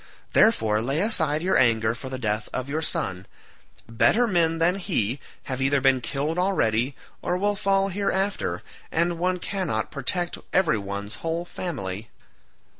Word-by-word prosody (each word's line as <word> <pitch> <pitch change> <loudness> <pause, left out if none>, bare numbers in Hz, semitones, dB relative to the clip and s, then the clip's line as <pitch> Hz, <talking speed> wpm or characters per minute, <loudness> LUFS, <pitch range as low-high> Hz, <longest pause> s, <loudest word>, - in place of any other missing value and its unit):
Therefore 110 - +4
lay 135 +6 +1
aside 165 -7 +2
your 190 - +3
anger 115 -2 +3
for 125 +2 -7
the 130 - -4
death 110 -3 -2
of 130 0 -3
your 150 +3 -2
son; 95 - -2 0.6
better 165 - +3
men 170 -6 +2
than 175 +4 +2
he 140 - 0 0.2
have 130 -1 -4
either 135 +1 +3
been 135 -1 +3
killed 145 +7 -2
already 130 - +1 0.3
or 180 - -1
will 205 +2 +1
fall 195 -1 +2
hereafter, 195 - -1 0.3
and 170 +1 +1
one 180 +1 +1
cannot 180 - -2
protect 175 +6 -1
every 165 - +3
one's 100 +2 -5
whole 165 +1 -2
family." 110 - -5
150 Hz, 150 wpm, -25 LUFS, 115-180 Hz, 0.6 s, Therefore